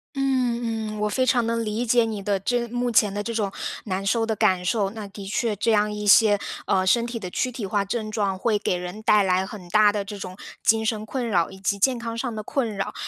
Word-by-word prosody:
嗯 240 Hz, -5 st, -1 dB
嗯， -, -, -6 dB
我 210 Hz, -, +1 dB
非 255 Hz, +4 st, 0 dB
常 240 Hz, -3 st, +2 dB
能 230 Hz, 0 st, 0 dB
理 215 Hz, +3 st, -2 dB
解 240 Hz, 0 st, +3 dB
你 215 Hz, -3 st, -4 dB
的 200 Hz, -1 st, 0 dB
这 240 Hz, +4 st, 0 dB
目 245 Hz, +1 st, -1 dB
前 210 Hz, -3 st, +3 dB
的 205 Hz, -, -3 dB
这 230 Hz, +2 st, -4 dB
种 205 Hz, -3 st, -1 dB, 0.3 s
难 195 Hz, -1 st, -3 dB
受 225 Hz, +3 st, +1 dB
的 225 Hz, -, -1 dB
感 185 Hz, -3 st, +2 dB
受。 200 Hz, +2 st, +1 dB
那 215 Hz, -1 st, -7 dB
的 195 Hz, 0 st, -9 dB
确 215 Hz, +2 st, -1 dB
这 220 Hz, +3 st, 0 dB
样 210 Hz, 0 st, +2 dB
一 210 Hz, 0 st, -4 dB
些， 205 Hz, 0 st, +6 dB, 0.3 s
呃， 190 Hz, -1 st, +2 dB
身 235 Hz, +4 st, +3 dB
体 235 Hz, -1 st, -4 dB
的 185 Hz, -, -5 dB
躯 250 Hz, +7 st, -2 dB
体 225 Hz, -4 st, -5 dB
化 200 Hz, +1 st, 0 dB
症 215 Hz, +2 st, -3 dB
状， 200 Hz, -3 st, -1 dB
会 215 Hz, +1 st, +1 dB
给 205 Hz, -, -1 dB
人 180 Hz, +4 st, -6 dB
带 210 Hz, -1 st, +5 dB
来 185 Hz, -1 st, +2 dB
很 190 Hz, -3 st, -10 dB
大 210 Hz, +2 st, +5 dB
的 205 Hz, -1 st, -2 dB
这 205 Hz, 0 st, -7 dB
种 185 Hz, -1 st, -7 dB, 0.3 s
精 220 Hz, 0 st, +3 dB
神 215 Hz, -1 st, -1 dB
困 240 Hz, +2 st, -3 dB
扰， 175 Hz, -6 st, +1 dB
以 190 Hz, -, -11 dB
及 200 Hz, +1 st, 0 dB
健 250 Hz, +4 st, +2 dB
康 230 Hz, -1 st, -5 dB
上 235 Hz, 0 st, -3 dB
的 215 Hz, -, -4 dB
困 235 Hz, -4 st, -2 dB
扰。 195 Hz, -, -4 dB
215 Hz, 270 characters per minute, -24 LUFS, 200-230 Hz, 0.3 s, 些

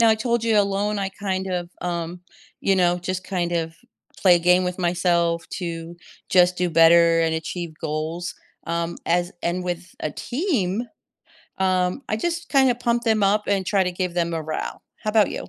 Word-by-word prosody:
Now, 230 Hz, -, +6 dB
I -, -, +5 dB
told 235 Hz, +1 st, -1 dB
you 225 Hz, -2 st, +3 dB
alone, 205 Hz, +1 st, +1 dB
I 195 Hz, -, -1 dB
kind 190 Hz, -1 st, -3 dB
of, 175 Hz, -1 st, -3 dB
um, 175 Hz, 0 st, -3 dB, 0.4 s
you 195 Hz, -1 st, +2 dB
know, 175 Hz, -1 st, +3 dB
just 185 Hz, +1 st, -4 dB
kind 175 Hz, -3 st, -2 dB
of 165 Hz, -1 st, -1 dB, 0.5 s
play 180 Hz, -3 st, +6 dB
a -, -, +1 dB
game 180 Hz, +2 st, +4 dB
with 180 Hz, +1 st, -3 dB
myself 170 Hz, -1 st, +1 dB
to 170 Hz, -1 st, -5 dB, 0.3 s
just 180 Hz, -1 st, +4 dB
do 180 Hz, -1 st, 0 dB
better 165 Hz, +1 st, +6 dB
and 160 Hz, -1 st, +1 dB
achieve 165 Hz, 0 st, -4 dB
goals, 160 Hz, +2 st, -3 dB, 0.3 s
um, 170 Hz, 0 st, -2 dB
as 175 Hz, +1 st, +1 dB
and 180 Hz, +1 st, -1 dB
with 175 Hz, 0 st, -5 dB
a 155 Hz, -, -2 dB
team, 240 Hz, -, -1 dB, 0.7 s
um, 185 Hz, +4 st, +1 dB
I 215 Hz, -, +1 dB
just 340 Hz, +8 st, -3 dB
kinda 265 Hz, -3 st, +4 dB
pump 240 Hz, -1 st, 0 dB
them 220 Hz, -2 st, +2 dB
up 205 Hz, +2 st, +3 dB
and 195 Hz, -2 st, +1 dB
try 195 Hz, -2 st, +2 dB
to 180 Hz, -, -2 dB
give 180 Hz, -1 st, -3 dB
them 170 Hz, -1 st, 0 dB
morale. 160 Hz, -1 st, -4 dB, 0.2 s
How 215 Hz, -, -2 dB
'bout 215 Hz, -3 st, +4 dB
you? -, -, -6 dB
180 Hz, 185 wpm, -23 LUFS, 170-200 Hz, 0.7 s, Now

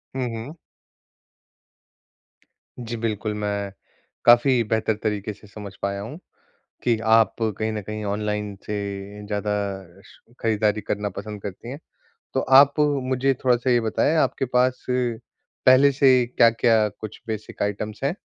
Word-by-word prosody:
हुँ, 130 Hz, -2 st, -1 dB
हुँ। 115 Hz, +7 st, -7 dB, 2.3 s
जी, 120 Hz, -1 st, -5 dB
बिल्कुल, 110 Hz, -1 st, -2 dB
मैं 100 Hz, -1 st, -3 dB, 0.5 s
काफ़ी 120 Hz, +1 st, +5 dB
बेहतर 110 Hz, 0 st, 0 dB
तरीके 105 Hz, -1 st, -2 dB
से 105 Hz, +1 st, -18 dB
समझ 100 Hz, -1 st, -9 dB
पाया 100 Hz, 0 st, -2 dB
हूँ 120 Hz, +9 st, -7 dB, 0.7 s
कि 120 Hz, -2 st, +2 dB, 0.2 s
आप 115 Hz, -3 st, +4 dB
कहीं 110 Hz, 0 st, -1 dB
न 105 Hz, -1 st, -4 dB
कहीं 105 Hz, +1 st, -6 dB
ऑनलाइन 105 Hz, 0 st, -2 dB
से 105 Hz, -, -3 dB, 0.5 s
ज़्यादा 105 Hz, 0 st, -2 dB, 0.5 s
श -, -, -18 dB, 0.2 s
खरीदारी 110 Hz, -1 st, +1 dB
करना 105 Hz, 0 st, -2 dB
पसंद 105 Hz, +1 st, -8 dB
करती 100 Hz, +4 st, -7 dB
हैं। 140 Hz, -, -6 dB, 0.6 s
तो 135 Hz, -, +2 dB
आप 135 Hz, +2 st, +6 dB
मुझे 135 Hz, -2 st, +1 dB
थोड़ा-सा 125 Hz, 0 st, +2 dB
ये 120 Hz, -1 st, +4 dB
बताएँ, 115 Hz, +7 st, +1 dB
आपके 155 Hz, -, +1 dB
पास 125 Hz, 0 st, +2 dB
पहले 125 Hz, +2 st, +2 dB
से 135 Hz, -1 st, +5 dB
क्या-क्या 115 Hz, -2 st, +3 dB
कुछ 110 Hz, +1 st, -10 dB
बेसिक 110 Hz, -2 st, -5 dB
आइटम्स 105 Hz, +1 st, -3 dB
हैं? 140 Hz, +5 st, +1 dB
110 Hz, 135 wpm, -23 LUFS, 105-125 Hz, 2.3 s, आप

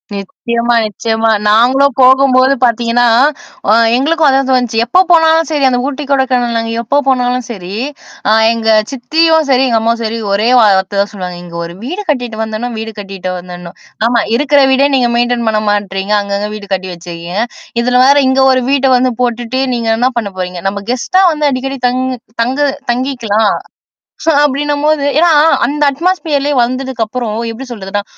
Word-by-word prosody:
நிச்சயமா, 235 Hz, +4 st, -2 dB
நிச்சயமா. 225 Hz, +2 st, -1 dB, 0.2 s
நாங்களும் 255 Hz, +5 st, +3 dB
போகும்போது 260 Hz, 0 st, +4 dB
பாத்தீங்கன்னா, 240 Hz, 0 st, +2 dB, 0.6 s
அ -, -, +5 dB, 0.2 s
எங்களுக்கும் 310 Hz, +4 st, +1 dB
அதான் 270 Hz, -1 st, +2 dB
தோணுச்சு. 245 Hz, -3 st, 0 dB
எப்போ 245 Hz, +10 st, +2 dB
போனாலும் 325 Hz, -1 st, +4 dB
சரி 295 Hz, -3 st, -1 dB
அந்த 245 Hz, -1 st, 0 dB
ஊட்டி, 290 Hz, +1 st, -4 dB
கொடைக்கானல் 245 Hz, -4 st, 0 dB
எப்போ 235 Hz, +5 st, -1 dB
போனாலும் 250 Hz, -1 st, 0 dB
சரி, 190 Hz, -5 st, -7 dB, 0.6 s
அ -, -, +4 dB, 0.2 s
எங்க 225 Hz, -1 st, -2 dB, 0.2 s
சித்தியும் 320 Hz, +5 st, +1 dB
சரி, 260 Hz, 0 st, +3 dB
எங்க 230 Hz, -2 st, +1 dB
அம்மாவும் 230 Hz, +1 st, 0 dB
சரி 225 Hz, +1 st, -3 dB
ஒரே 210 Hz, +3 st, +1 dB
வார்த்த 200 Hz, -2 st, +2 dB
தான் 200 Hz, -, -3 dB
சொல்லுவாங்க. 180 Hz, -3 st, -6 dB
"இங்க 170 Hz, -1 st, -11 dB
ஒரு 170 Hz, 0 st, -7 dB
வீடு 350 Hz, +11 st, -4 dB
கட்டிட்டு 245 Hz, -6 st, -2 dB
வந்தரணும் 220 Hz, +2 st, -5 dB
வீடு 225 Hz, 0 st, -6 dB
கட்டிட்டு 195 Hz, -2 st, -6 dB
வந்தரணும்." 175 Hz, -1 st, -10 dB, 0.3 s
ஆமா 235 Hz, -1 st, +2 dB
இருக்கிற 285 Hz, +2 st, +2 dB
வீடே 270 Hz, +2 st, +3 dB
நீங்க 245 Hz, -2 st, +2 dB
மெயின்டெயின் 240 Hz, -1 st, 0 dB
பண்ண 215 Hz, -1 st, 0 dB
மாட்றீங்க. 200 Hz, -1 st, -2 dB
அங்கங்க 200 Hz, +1 st, -3 dB
வீடு 205 Hz, -1 st, -9 dB
கட்டி 190 Hz, 0 st, -3 dB
வச்சிருக்கீங்க. 170 Hz, +2 st, -7 dB, 0.4 s
இதுல 250 Hz, +1 st, 0 dB
வேற 280 Hz, +2 st, +5 dB
இங்க 265 Hz, +1 st, +1 dB
ஒரு 255 Hz, 0 st, +2 dB
வீட்ட 275 Hz, -1 st, +2 dB
வந்து 255 Hz, +1 st, +1 dB
போட்டுட்டு, 240 Hz, +1 st, -2 dB
நீங்க 230 Hz, -2 st, -2 dB
என்ன 250 Hz, +3 st, +2 dB
பண்ண 220 Hz, -4 st, -2 dB
போறீங்க? 180 Hz, -1 st, -5 dB
நம்ம 200 Hz, +1 st, -6 dB
கெஸ்ட்டா 370 Hz, +10 st, +1 dB
வந்து 300 Hz, -1 st, 0 dB
அடிக்கடி 270 Hz, +1 st, -4 dB
தங் 255 Hz, +1 st, -1 dB, 0.4 s
தங்கு 265 Hz, +5 st, 0 dB, 0.2 s
தங்கிக்கலாம். 235 Hz, -5 st, 0 dB, 0.9 s
அப்பிடின்னும்போது, 295 Hz, +1 st, 0 dB
ஏன்னா, 340 Hz, +2 st, +4 dB, 0.4 s
அந்த 295 Hz, +4 st, -1 dB
அட்மாஸ்பீியர்லே 300 Hz, -2 st, -1 dB
வந்ததுக்கப்புறம் 245 Hz, -3 st, -3 dB, 0.2 s
எப்பிடி 255 Hz, +4 st, -9 dB
சொல்றதுன்னா 205 Hz, -1 st, -4 dB
245 Hz, 155 wpm, -13 LUFS, 215-270 Hz, 0.9 s, அ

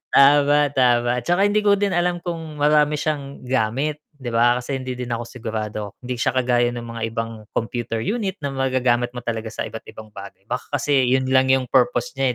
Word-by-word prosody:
Tama, 145 Hz, +1 st, +6 dB, 0.2 s
tama, 120 Hz, -2 st, +3 dB
'tsaka 185 Hz, +4 st, +3 dB
hindi 210 Hz, +1 st, +2 dB
ko 200 Hz, -1 st, +5 dB
din 200 Hz, -1 st, 0 dB
alam 175 Hz, 0 st, +1 dB
kung 165 Hz, -4 st, -6 dB
marami 150 Hz, 0 st, +4 dB
siyang 140 Hz, -3 st, -3 dB
gamit, 130 Hz, +5 st, 0 dB
'di 130 Hz, -4 st, -6 dB
ba, 120 Hz, +2 st, +3 dB
kasi 135 Hz, +2 st, -4 dB
hindi 130 Hz, 0 st, -5 dB
din 125 Hz, -1 st, -4 dB
ako 115 Hz, 0 st, -2 dB
sigurado, 110 Hz, -3 st, -5 dB, 0.2 s
'di 125 Hz, 0 st, -3 dB
siya 130 Hz, -, 0 dB
kagaya 120 Hz, -1 st, +2 dB
ng 120 Hz, -, -5 dB
mga 115 Hz, -1 st, -7 dB
ibang 115 Hz, -1 st, -5 dB
computer 115 Hz, 0 st, -2 dB
unit 205 Hz, -4 st, -2 dB
na 140 Hz, -, -2 dB
magagamit 130 Hz, -2 st, +1 dB
mo -, -, -3 dB
talaga 115 Hz, -1 st, -3 dB
sa -, -, -3 dB
iba't-ibang 110 Hz, -1 st, -10 dB
bagay, 100 Hz, -1 st, -11 dB
baka 125 Hz, +1 st, -4 dB
kasi 140 Hz, 0 st, +2 dB
'yun 130 Hz, +1 st, +2 dB
lang 130 Hz, 0 st, +4 dB
'yung 130 Hz, -1 st, +2 dB
purpose 125 Hz, -2 st, +2 dB
niya, 130 Hz, -2 st, +2 dB
130 Hz, 195 wpm, -22 LUFS, 120-145 Hz, 0.2 s, Tama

